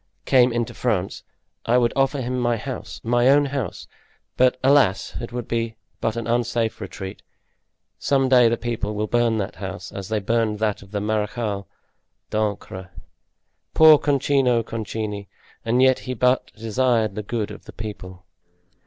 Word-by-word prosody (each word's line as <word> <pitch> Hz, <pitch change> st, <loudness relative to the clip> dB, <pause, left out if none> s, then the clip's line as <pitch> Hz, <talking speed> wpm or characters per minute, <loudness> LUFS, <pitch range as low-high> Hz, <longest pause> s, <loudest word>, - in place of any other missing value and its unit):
—came 125 Hz, -2 st, +5 dB
into 120 Hz, -1 st, -2 dB
France, 105 Hz, -7 st, -1 dB, 0.5 s
I 120 Hz, +2 st, +4 dB
would 120 Hz, -1 st, +2 dB
offer 135 Hz, 0 st, +1 dB
him 125 Hz, +1 st, -2 dB
my 120 Hz, -1 st, +1 dB
house—my 120 Hz, 0 st, -1 dB
own 145 Hz, +2 st, +5 dB
house; 140 Hz, -1 st, -4 dB, 0.5 s
but, 130 Hz, 0 st, +3 dB
alas! 135 Hz, -8 st, +3 dB
it 120 Hz, -, -6 dB
would 120 Hz, -1 st, -5 dB
be 115 Hz, -1 st, -2 dB, 0.2 s
but 115 Hz, 0 st, -1 dB
an 115 Hz, -1 st, -3 dB
unsafe 120 Hz, -1 st, 0 dB
retreat. 95 Hz, 0 st, -7 dB, 0.8 s
Some 135 Hz, -1 st, +2 dB
day 125 Hz, -2 st, +6 dB
the 115 Hz, -, 0 dB
people 110 Hz, -3 st, -3 dB
will 105 Hz, +1 st, -1 dB
burn 120 Hz, 0 st, +1 dB
that 100 Hz, 0 st, -4 dB
house, 95 Hz, -2 st, -6 dB
as 100 Hz, 0 st, -7 dB
they 110 Hz, -, 0 dB
burned 110 Hz, +1 st, 0 dB
that 105 Hz, -1 st, -1 dB
of 100 Hz, -, -14 dB
the 100 Hz, 0 st, -3 dB
Marechal 105 Hz, -1 st, -2 dB, 0.6 s
d'Ancre. 100 Hz, -3 st, -3 dB, 0.9 s
Poor 155 Hz, -2 st, +8 dB
Concino 135 Hz, -4 st, +2 dB
Concini! 110 Hz, -3 st, -4 dB, 0.4 s
And 120 Hz, +3 st, +2 dB
yet 130 Hz, -1 st, +4 dB
he 130 Hz, -1 st, -5 dB
but 125 Hz, +2 st, +2 dB
desired 115 Hz, -1 st, +1 dB
the 105 Hz, -, -4 dB
good 105 Hz, 0 st, -3 dB
of -, -, -11 dB
the -, -, -10 dB
people." 95 Hz, -4 st, -8 dB
115 Hz, 155 wpm, -23 LUFS, 105-125 Hz, 0.9 s, Poor